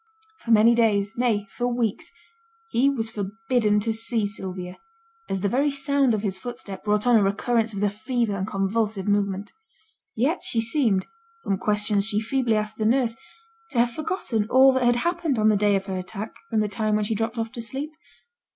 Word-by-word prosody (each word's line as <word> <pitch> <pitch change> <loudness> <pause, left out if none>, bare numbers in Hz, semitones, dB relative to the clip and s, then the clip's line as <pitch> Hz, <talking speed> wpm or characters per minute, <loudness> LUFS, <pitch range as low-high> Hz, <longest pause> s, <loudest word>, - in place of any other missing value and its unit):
For - - -11
many 225 +1 +6
days, 220 -2 +2
nay, 230 -4 +1
for 240 +6 -2
weeks, 240 -4 -1 0.6
he 265 - +3
was 225 -5 -2
forbidden 215 +1 0
to 225 +1 0
see 225 -1 0
Sylvia, 185 -3 -6 0.5
as 195 - -2
the 200 - +1
very 275 +8 +2
sound 275 -3 +1
of 210 - -4
his 190 -2 -2
footstep 200 -4 -7
brought 210 +1 +1
on 245 -2 +5
a - - +4
recurrence 225 +3 +1
of 200 -2 -5
the 205 - +3
fever 225 0 -1
and 190 0 -3
convulsive 205 0 -1
movement. 200 0 0 0.6
Yet 285 +10 +1
she 230 - -1
seemed, 225 -4 +1 0.4
from 195 -1 -1
questions 210 0 +1
she 210 -2 +1
feebly 230 0 0
asked 215 0 -2
the 215 - -1
nurse, 235 -1 +2 0.5
to 255 - -6
have 240 +1 +3
forgotten 235 - -2
all 265 +1 +6
that 260 -1 +1
had 240 0 +4
happened 335 0 0
on 215 0 +4
the 215 - +4
day 205 0 +3
of 195 0 -1
her 190 -2 -3
attack 195 +4 -6 0.2
from 220 -2 +1
the 210 - 0
time 215 +1 0
when 210 0 +1
she 220 - -1
dropped 225 +2 -2
off 225 -1 -2
to 235 - -6
sleep. 270 +7 -4
220 Hz, 195 wpm, -24 LUFS, 205-240 Hz, 0.6 s, many